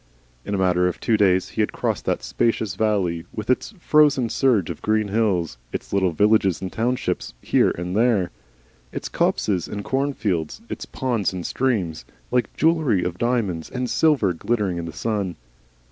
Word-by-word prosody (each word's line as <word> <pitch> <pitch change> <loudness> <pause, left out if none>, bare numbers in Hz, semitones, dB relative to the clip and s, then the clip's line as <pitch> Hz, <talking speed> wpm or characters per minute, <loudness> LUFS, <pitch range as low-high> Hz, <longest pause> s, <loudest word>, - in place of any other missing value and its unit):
In 100 - -2
a - - 0
matter 90 -1 +3
of 90 - -3
two 115 - +2
days 95 -3 +3
he - - -1
had - - 0
crossed - - -2
that - - -1
spacious 110 -3 0
valley, 95 -6 0
with 110 +2 -2
its 170 - -1
frozen 145 -7 +4
surge 110 - +2
of 80 - -8
green 110 -1 +1
hills, 95 - 0
its - - -6
little 95 -2 +3
villages 100 0 +3
and 95 -1 -6
townships 120 - -1
here - - +3
and 90 +2 -3
there, 110 -5 +2 0.6
its - - -5
copses 95 -5 0
and 100 0 -5
cornfields, 110 - -1
its - - -6
ponds 120 -7 -1
and 90 -2 -5
streams 105 - -1 0.3
like 125 -4 +1
jewelery 155 - +2
of 90 0 -3
diamonds 110 -9 0
and 125 -1 -3
silver 140 - +3
glittering 100 0 -1
in 85 - -4
the 85 - -5
sun. 100 -3 -2
105 Hz, 170 wpm, -23 LUFS, 90-120 Hz, 0.6 s, frozen